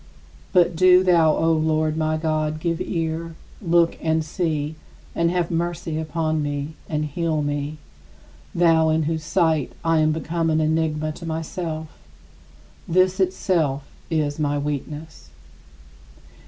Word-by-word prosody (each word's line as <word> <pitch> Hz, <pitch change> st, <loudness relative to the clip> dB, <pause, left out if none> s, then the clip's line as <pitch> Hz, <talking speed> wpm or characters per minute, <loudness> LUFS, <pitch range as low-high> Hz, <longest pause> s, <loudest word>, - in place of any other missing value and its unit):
But 175 Hz, -1 st, +4 dB
do 185 Hz, +1 st, +6 dB
thou, 165 Hz, -4 st, +4 dB
O 165 Hz, 0 st, +2 dB
Lord, 155 Hz, -1 st, +1 dB
my 155 Hz, 0 st, 0 dB
God, 155 Hz, -1 st, -1 dB
give 165 Hz, +1 st, -1 dB
ear; 165 Hz, -1 st, -3 dB, 0.3 s
look 170 Hz, -2 st, +2 dB
and 160 Hz, -1 st, +1 dB
see, 155 Hz, -3 st, -2 dB, 0.4 s
and 170 Hz, 0 st, +1 dB
have 175 Hz, -1 st, -1 dB
mercy 170 Hz, -1 st, -2 dB
upon 160 Hz, -1 st, -1 dB
me; 145 Hz, 0 st, -2 dB, 0.2 s
and 150 Hz, -1 st, -1 dB
heal 155 Hz, 0 st, -1 dB
me 145 Hz, +1 st, -3 dB, 0.8 s
thou, 165 Hz, -2 st, +4 dB
in 160 Hz, 0 st, +2 dB
whose 160 Hz, +1 st, -2 dB
sight 160 Hz, -3 st, +1 dB
I 165 Hz, -1 st, +3 dB
am 155 Hz, 0 st, +3 dB
become 165 Hz, +1 st, -1 dB
an 155 Hz, 0 st, +2 dB
enigma 155 Hz, -1 st, 0 dB
to 170 Hz, +3 st, -9 dB
myself; 160 Hz, 0 st, -4 dB, 1.0 s
this 185 Hz, +2 st, +2 dB
itself 175 Hz, -7 st, +1 dB, 0.3 s
is 155 Hz, -3 st, -1 dB
my 145 Hz, -1 st, 0 dB
weakness. 145 Hz, -, -5 dB
160 Hz, 130 wpm, -23 LUFS, 155-170 Hz, 1.0 s, do